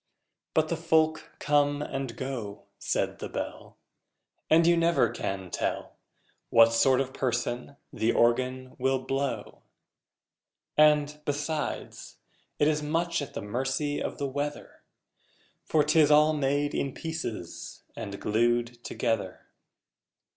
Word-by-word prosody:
But 155 0 +3
the 170 - -1
folk 160 -1 +1
come 145 0 +2
and 135 -5 -4
go, 125 -7 -5 0.2
Said - - -1
the - - -5
Bell, - - -6 0.7
And 165 +1 +5
you 170 0 +5
never 170 0 +3
can 95 -2 -4
tell - - -3 0.5
What 115 0 +6
sort 130 +3 +4
of 130 -1 -2
person 125 +1 -2 0.2
the 115 - +1
Organ 130 +2 +1
will 135 +1 +2
blow! 135 +1 -3 1.1
And, 150 -1 +4
besides, 150 +1 -4 0.4
it 145 - +3
is 150 -1 +1
much 165 +2 0
at 140 - -7
the - - -4
mercy 135 +7 -1
of - - -4
the 140 - -2
weather 145 +2 -4 0.8
For 155 -2 +3
'tis 150 0 +4
all 150 +1 +6
made 145 0 0
in 135 -2 -2
pieces 160 - -6
and 100 0 -6
glued 120 +2 0
together! 105 -5 -2
140 Hz, 125 wpm, -28 LUFS, 120-150 Hz, 1.1 s, What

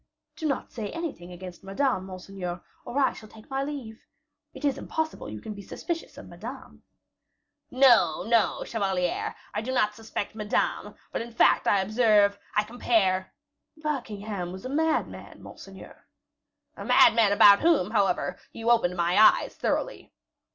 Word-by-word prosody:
"Do 315 - -3
not 275 - -3
say 215 -4 -5
anything 310 - -6
against 180 0 -10
Madame, 195 0 -1
monseigneur, 185 -1 -7 0.2
or 255 - -5
I 275 -2 +3
shall 215 - -13
take 220 +4 -16
my 270 0 -1
leave. 270 -6 -7 0.4
It - - -7
is 280 - 0
impossible 315 - -4
you 105 0 -7
can 215 - -6
be 200 - -9
suspicious 335 - -6
of - - -10
Madame?" - - -10 0.9
"No, 240 - +4
no, 225 +1 +1
chevalier; 190 -5 -2 0.2
I 210 - -2
do 250 +3 -4
not 215 -5 +1
suspect 220 -1 -5
Madame; 210 -1 -2 0.2
but - - -3
in 235 +1 -7
fact, 230 - +3
I 200 - +4
observe 210 -1 +3 0.2
I 210 - +3
compare 210 -5 0 0.2
" - - -52
"Buckingham 210 -10 -4
was 190 +4 -9
a - - -4
madman, 315 +3 -2
monseigneur." - - -13 0.7
"A - - -8
madman 220 -3 +5
about 200 0 +7
whom, 310 - +3
however, 200 -5 0
you 230 +1 -1
opened 180 -7 +2
my 175 +2 +1
eyes 220 - +5
thoroughly." - - -3
215 Hz, 155 wpm, -26 LUFS, 190-255 Hz, 0.9 s, about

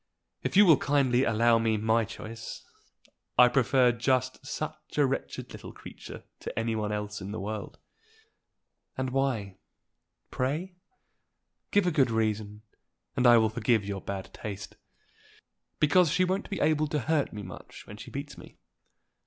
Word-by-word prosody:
"If - - -1
you 205 - +9
will 160 -6 +7
kindly 135 -3 +2
allow 115 +1 +4
me 110 -1 +1
my 110 +1 +2
choice, 115 0 -8 0.7
I 125 - +9
prefer 125 0 +4
just 130 +2 0
such 150 +3 -6
a 145 - +5
wretched 135 - -4
little - - -9
creature - - -11 0.2
to - - -7
any 115 0 0
one 105 -1 -2
else 105 0 -4
in 95 +1 -6
the 110 - -4
world." 105 +1 -5 1.2
"And 130 0 -2
why, 125 -8 -1 0.7
pray? 155 +9 -2 1.0
Give 205 -2 +3
a 180 - +2
good 140 -6 +3
reason, 110 -2 -1 0.5
and 125 - +3
I 120 -1 +8
will 110 -1 +3
forgive 110 -1 +1
your 100 -1 -4
bad 95 -1 -6
taste." 100 -2 -7 1.0
"Because 155 +3 +4
she 180 +4 +2
won't 190 +3 -2
be 195 - -3
able 155 0 +2
to 150 0 -1
hurt 155 0 0
me 105 -1 -7
much 90 -1 -11
when 105 - -10
she - - -10
beats 140 +1 -7
me." - - -14
120 Hz, 155 wpm, -28 LUFS, 110-145 Hz, 1.2 s, you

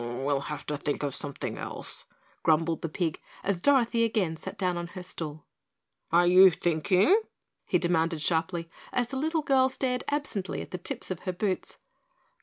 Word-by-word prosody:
"We'll 135 +4 -1
have 150 +1 -6
to 150 - -2
think 145 0 -2
of 140 -2 -1
something 140 +1 -4
else," - - -7 0.4
grumbled 165 +1 +2
the 165 - -3
pig, 160 0 -2 0.2
as 190 -3 -1
Dorothy 240 -3 +4
again 205 -8 +1
sat 160 - -7
down 185 -2 0
on 175 0 -3
her 180 +1 -8
stool. 155 -4 -6 0.7
"Are 175 +1 +5
you 185 +2 +8
thinking?" 180 - +3 0.5
he 180 - +3
demanded 165 -2 +1
sharply, 165 +1 0 0.2
as 245 -1 0
the 265 - -4
little 315 +3 0
girl 265 -2 +4
stared 250 -1 -1
absently 285 -10 -1
at - - -14
the 180 - -4
tips 180 - -4
of 180 - -3
her 185 - -3
boots. 185 +1 -2
180 Hz, 175 wpm, -28 LUFS, 160-220 Hz, 0.7 s, you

